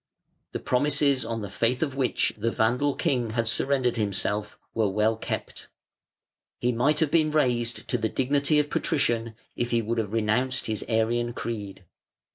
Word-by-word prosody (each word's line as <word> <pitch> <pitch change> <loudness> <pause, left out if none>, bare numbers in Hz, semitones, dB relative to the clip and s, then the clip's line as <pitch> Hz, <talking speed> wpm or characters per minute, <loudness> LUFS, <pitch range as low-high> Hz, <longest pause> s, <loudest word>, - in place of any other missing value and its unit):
The - - -2
promises 140 0 +2
on 115 -1 -4
the - - -4
faith 120 +7 +1
of 140 -4 -3
which 135 -2 +1
the 110 +2 -1
Vandal 125 +5 +1
king 130 -9 0
had 115 -1 +1
surrendered 125 0 +1
himself 105 0 -2 0.2
were 110 -3 +1
well 105 +3 +2
kept. 110 - -5 0.9
He 125 - +1
might 140 +6 +2
have 155 -3 +2
been 155 -2 +3
raised 120 -6 0
to 125 - +1
the 110 0 0
dignity 140 +4 +1
of 150 0 +1
Patrician, 115 -7 0 0.2
if 120 - -1
he 115 -1 +1
would 115 +2 -1
have 105 -3 -2
renounced 115 +4 0
his 110 -2 -1
Arian 120 +1 +1
creed. 100 -6 -6
120 Hz, 165 wpm, -26 LUFS, 110-135 Hz, 0.9 s, been